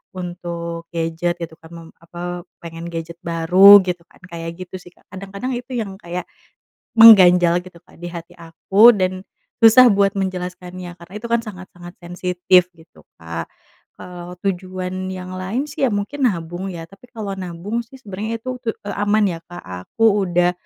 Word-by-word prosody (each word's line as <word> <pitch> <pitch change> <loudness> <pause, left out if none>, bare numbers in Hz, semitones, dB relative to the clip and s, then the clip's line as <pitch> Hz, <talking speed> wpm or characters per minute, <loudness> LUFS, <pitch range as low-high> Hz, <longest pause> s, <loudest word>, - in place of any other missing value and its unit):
untuk 170 -2 -6
gadget, 165 +1 -1
gitu 165 -1 -7
kan, 160 0 -16
mem 165 -1 -11
apa, 175 +1 -7 0.2
pengen 165 0 -8
gadget 165 0 -6
baru, 180 +5 +7
gitu 180 -2 -4
kan, - - -24
kayak 165 0 -6
gitu 185 - -10
sih, 175 0 -16
Kak. - - -29
Kadang-kadang 195 +6 -6
itu 245 +2 -8
yang 210 -5 -4
kayak 175 -1 -6 0.7
mengganjal, 180 -6 +8
gitu, 180 -2 -14
Kak, - - -22
di 175 - -5
hati 170 -1 -9
aku 190 +7 +5
dan 185 -2 -2 0.4
susah 230 +3 +8
buat 200 0 +2
menjelaskannya, 180 -1 -5
karena 170 +2 -14
itu 225 +3 -7
kan 235 0 +2
sangat-sangat 180 -3 -11
sensitif, 180 +1 +1
gitu, 165 0 -20
Kak. 85 0 -6 0.5
Kalau 180 0 -9
tujuan 185 -1 -4
yang 185 0 -7
lain 200 +9 -3
sih, 280 -1 -1
ya - - 0
mungkin 255 +8 -2
nabung 175 0 -5
ya, 165 -1 -7
tapi 195 +5 -18
kalau 210 -4 -5
nabung 185 +5 -4
sih 265 +4 -15
sebenarnya 220 +2 -5
itu 255 +1 -5
ke, 225 -3 -2
eee, 205 - -4
aman 205 +1 +2
ya, 170 -2 -5
Kak, 175 0 -11 0.2
aku 225 - 0 0.2
udah, 175 0 +2
180 Hz, 170 wpm, -20 LUFS, 170-200 Hz, 0.7 s, mengganjal